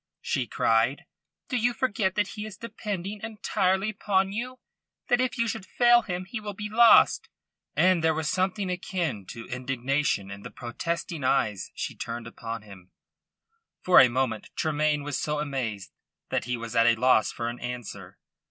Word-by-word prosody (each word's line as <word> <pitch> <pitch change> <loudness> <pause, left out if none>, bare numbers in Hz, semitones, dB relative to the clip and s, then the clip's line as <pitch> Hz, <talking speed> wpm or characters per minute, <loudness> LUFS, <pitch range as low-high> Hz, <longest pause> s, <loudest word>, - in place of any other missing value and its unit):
she - - -1
cried. 115 +5 +1 0.4
"Do 255 - -3
you 240 +1 +1
forget 210 -7 0
that 205 -2 +1
he 210 - -6
is 215 -2 -8
depending 205 -3 -5
entirely 205 -2 0
upon 195 -2 +1
you 245 +5 -4 0.5
that 245 0 +4
if 255 0 -1
you 230 0 +1
should 200 - -3
fail 240 +4 +4
him 185 -4 -4
he 220 +4 -5
will 210 -2 -6
be 210 +1 -5
lost?" 235 +1 +6 0.5
And 180 -2 +4
there 160 -1 +3
was 160 -1 -2
something 185 +2 0
akin 175 - -3
to 115 -1 -8
indignation 130 -4 -1
in 100 0 -8
the - - -8
protesting 165 +5 -4
eyes 105 -7 +1
she - - -4
turned 115 0 -5
upon 115 -1 -6
him. 95 -3 -14 0.9
For 185 - +7
a 130 - +7
moment 120 -3 -1
Tremayne 150 -1 +1
was 145 -2 -3
so 150 0 -1
amazed 130 -9 -3 0.4
that - - -1
he 125 0 -2
was 115 0 -7
at 115 0 +5
a 120 - +5
loss 115 -2 +3
for 115 - -4
an 120 +1 -5
answer. 120 -2 -7
160 Hz, 170 wpm, -27 LUFS, -, 0.9 s, For